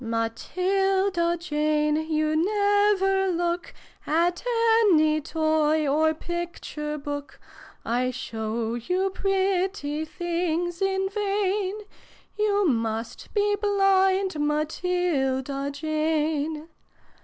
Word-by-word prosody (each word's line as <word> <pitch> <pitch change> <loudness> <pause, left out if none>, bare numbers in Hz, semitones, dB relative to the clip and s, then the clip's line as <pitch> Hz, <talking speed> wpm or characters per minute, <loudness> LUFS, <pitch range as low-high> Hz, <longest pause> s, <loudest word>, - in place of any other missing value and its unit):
"Matilda 360 - 0
Jane, 300 -2 +1
you 310 0 +1
never 405 +1 +2
look 345 0 -1 0.4
At 340 +3 +1 0.5
any 310 -1 +3
toy 315 -1 +1
or 315 +3 +2
picture 330 -3 -5
book: 285 0 -6 0.5
I 245 +2 0
show 225 -2 -3
you 365 +11 -1
pretty 380 -5 -1
things 345 +1 -2
in 385 0 +1
vain 405 0 -1 0.5
You 410 -2 +2
must 225 -3 -2
be 415 0 +2
blind, 390 -3 +2
Matilda 295 -3 -1
Jane 310 +1 -1
330 Hz, 85 wpm, -25 LUFS, 300-385 Hz, 0.5 s, any